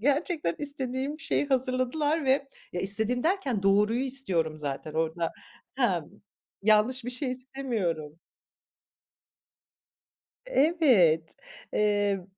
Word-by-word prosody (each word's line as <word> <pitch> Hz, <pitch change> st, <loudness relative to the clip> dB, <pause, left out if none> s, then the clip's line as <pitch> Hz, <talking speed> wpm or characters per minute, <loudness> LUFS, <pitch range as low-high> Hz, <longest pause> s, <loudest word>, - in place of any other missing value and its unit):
gerçekten 290 Hz, -, +1 dB
istediğim 280 Hz, +1 st, -3 dB
şeyi 290 Hz, -, 0 dB
hazırladılar 265 Hz, +4 st, 0 dB
ve, 275 Hz, +1 st, +2 dB, 0.2 s
ya, 180 Hz, -, -2 dB
istediğim 220 Hz, +6 st, 0 dB
derken 300 Hz, -, 0 dB
doğruyu 210 Hz, +4 st, +3 dB
istiyorum 185 Hz, -, -1 dB
zaten 150 Hz, +1 st, -5 dB
orada. 165 Hz, +1 st, -1 dB, 0.4 s
He. 270 Hz, -, -1 dB, 0.8 s
Yanlış 220 Hz, +4 st, +3 dB
bir 245 Hz, -, -3 dB
şey 250 Hz, +1 st, -2 dB
istemiyorum. 225 Hz, -, -3 dB, 2.3 s
Evet, 265 Hz, -, +3 dB, 0.4 s
emm, 205 Hz, -2 st, +1 dB
245 Hz, 90 wpm, -28 LUFS, 190-275 Hz, 2.3 s, doğruyu